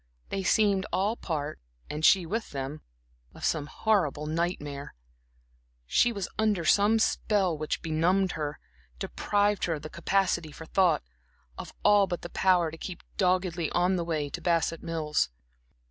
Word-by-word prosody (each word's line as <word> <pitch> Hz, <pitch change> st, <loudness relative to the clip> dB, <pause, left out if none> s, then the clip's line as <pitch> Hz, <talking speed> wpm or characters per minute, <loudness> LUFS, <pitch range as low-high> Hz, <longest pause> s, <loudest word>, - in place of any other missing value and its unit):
They 195 Hz, -, -2 dB
seemed 200 Hz, 0 st, +2 dB
all 205 Hz, +4 st, +1 dB
part, 155 Hz, -8 st, -4 dB, 0.3 s
and 150 Hz, +1 st, -5 dB
she 185 Hz, +1 st, +6 dB
with 220 Hz, +7 st, -3 dB
them 140 Hz, +2 st, -5 dB, 0.5 s
of 160 Hz, -, -5 dB
some 150 Hz, -3 st, 0 dB
horrible 160 Hz, -8 st, 0 dB
nightmare; 150 Hz, -, -3 dB, 0.9 s
she 240 Hz, -, +3 dB
was 200 Hz, -5 st, -3 dB
under 210 Hz, -6 st, +1 dB
some 205 Hz, +5 st, +4 dB
spell 200 Hz, -5 st, +1 dB
which 155 Hz, 0 st, -3 dB
benumbed 175 Hz, +4 st, +2 dB
her, 150 Hz, -1 st, -4 dB, 0.4 s
deprived 205 Hz, -, 0 dB
her 165 Hz, -, 0 dB
of 150 Hz, -, -9 dB
the 155 Hz, -, -7 dB
capacity 190 Hz, -5 st, 0 dB
for 160 Hz, -, -10 dB
thought, 180 Hz, -, +2 dB, 0.5 s
of -, -, -8 dB
all 205 Hz, -1 st, +5 dB
but 175 Hz, -2 st, -4 dB
the 175 Hz, -, -6 dB
power 180 Hz, -4 st, +2 dB
to 165 Hz, -, -10 dB
keep 180 Hz, -2 st, -7 dB
doggedly 180 Hz, -3 st, +1 dB
on 180 Hz, +2 st, +2 dB
the 175 Hz, -, -1 dB
way 155 Hz, -3 st, -1 dB
to -, -, -5 dB
Bassett 165 Hz, -1 st, +1 dB
Mills. 155 Hz, -, 0 dB
175 Hz, 155 wpm, -28 LUFS, 155-195 Hz, 0.9 s, she